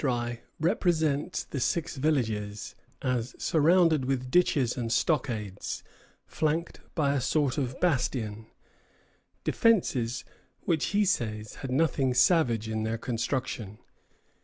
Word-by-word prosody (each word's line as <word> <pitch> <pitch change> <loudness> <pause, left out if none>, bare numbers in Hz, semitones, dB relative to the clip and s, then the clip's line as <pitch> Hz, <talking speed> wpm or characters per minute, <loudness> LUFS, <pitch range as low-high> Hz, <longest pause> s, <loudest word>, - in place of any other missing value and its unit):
] - - -14
La - - +2
Vérendrye 120 -1 -1 0.2
represents 160 -4 +1
the 140 - -5
six 155 +7 -1
villages 110 -9 -1 0.3
as 125 -2 -1
surrounded 160 -2 +3
with 130 -1 -2
ditches 145 -8 +3
and 115 -3 -3
stockades, 110 - -1 0.4
flanked 160 +2 -1 0.2
by 145 -3 +2
a 140 - 0
sort 145 +1 +1
of 130 -2 -3
bastion, 120 -9 0 1.0
defences 130 - +2 0.4
which, 160 -7 +1
he 205 +3 +2
says, 110 - -2
had 135 - -4
nothing 135 -2 +1
savage 125 - +3
in 110 0 -2
their 110 +1 -1
construction. 115 -3 -3
130 Hz, 120 wpm, -28 LUFS, 115-155 Hz, 1.0 s, surrounded